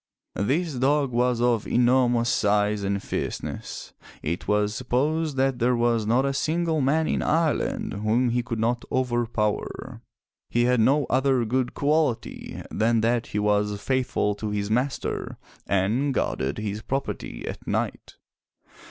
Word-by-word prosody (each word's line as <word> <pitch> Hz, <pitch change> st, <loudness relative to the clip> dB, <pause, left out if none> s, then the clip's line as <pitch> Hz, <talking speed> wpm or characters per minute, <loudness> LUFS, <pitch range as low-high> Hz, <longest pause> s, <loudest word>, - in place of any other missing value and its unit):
This 155 Hz, -, 0 dB
dog 135 Hz, +2 st, +1 dB
was 120 Hz, 0 st, +1 dB
of 120 Hz, -3 st, +2 dB
enormous 120 Hz, -1 st, +3 dB
size 105 Hz, -1 st, +2 dB
and 100 Hz, 0 st, -1 dB
fierceness. -, -, -5 dB, 0.3 s
It 85 Hz, +3 st, -3 dB
was 105 Hz, 0 st, +2 dB
supposed 140 Hz, +5 st, 0 dB
that 135 Hz, -1 st, +1 dB
there 125 Hz, +2 st, +3 dB
was 115 Hz, -2 st, +1 dB
not 125 Hz, +4 st, +3 dB
a 140 Hz, -, 0 dB
single 160 Hz, +2 st, 0 dB
man 155 Hz, +4 st, +2 dB
in -, -, 0 dB
Ireland 160 Hz, -1 st, 0 dB
whom 110 Hz, +5 st, +1 dB
he 120 Hz, +1 st, +1 dB
could 115 Hz, -1 st, -4 dB
not 120 Hz, +2 st, 0 dB
overpower. 120 Hz, -4 st, -1 dB, 0.5 s
He 120 Hz, -, +2 dB
had 125 Hz, 0 st, +3 dB
no 140 Hz, +5 st, +3 dB
other 130 Hz, -2 st, +2 dB
good 125 Hz, +2 st, -1 dB
quality 145 Hz, -5 st, -1 dB
than 115 Hz, +1 st, +2 dB
that 115 Hz, +1 st, +1 dB
he -, -, -4 dB
was 105 Hz, 0 st, +1 dB
faithful 130 Hz, -3 st, 0 dB
to 110 Hz, -, -3 dB
his 105 Hz, 0 st, -2 dB
master 130 Hz, +4 st, -1 dB, 0.3 s
and 110 Hz, +9 st, +1 dB
guarded 65 Hz, +2 st, -1 dB
his 105 Hz, 0 st, -3 dB
property 135 Hz, -, -4 dB
at -, -, -7 dB
night. -, -, -2 dB
120 Hz, 145 wpm, -25 LUFS, 105-135 Hz, 0.5 s, enormous